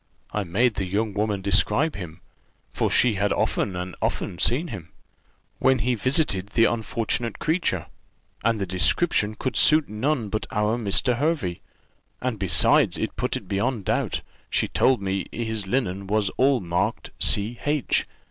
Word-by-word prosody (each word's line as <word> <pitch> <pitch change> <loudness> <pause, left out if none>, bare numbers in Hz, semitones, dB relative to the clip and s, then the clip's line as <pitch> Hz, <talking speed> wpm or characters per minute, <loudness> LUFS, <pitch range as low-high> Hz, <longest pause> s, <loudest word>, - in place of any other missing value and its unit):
I 105 - -1
made 110 +7 +1
the 100 -2 -3
young 105 +3 -1
woman 105 -1 -1
describe 115 +9 +2
him, 90 -4 -8 0.5
for - - 0
she 125 -2 +3
had 100 0 0
often 95 - 0
and 90 0 -5
often 85 - -2
seen 155 +8 +1
him, 85 -4 -8 0.7
when 130 0 +3
he 125 +2 0
visited 120 - +1
the 115 +2 +3
unfortunate 115 0 -1
creature; 155 - 0 0.6
and 115 0 +2
the 100 - -2
description 105 - +1
could 130 +4 -3
suit 155 0 +5
none 115 +1 -1
but 110 +1 -3
our 105 +1 0
Mr. 115 +3 +2
Hervey, 145 - -1 0.6
and 125 -4 -3
besides 95 -2 +4
it - - -3
put - - -1
it - - -11
beyond 110 +4 -1
a - - -16
doubt, - - -1 0.3
she - - +1
told 130 -6 +2
me 95 0 -2
his 110 -3 -3
linen 100 -4 -2
was 105 0 +1
all 135 -1 +2
marked 85 -1 -2
C. 110 +4 +1
H. 145 -2 0
105 Hz, 160 wpm, -24 LUFS, 95-125 Hz, 0.7 s, suit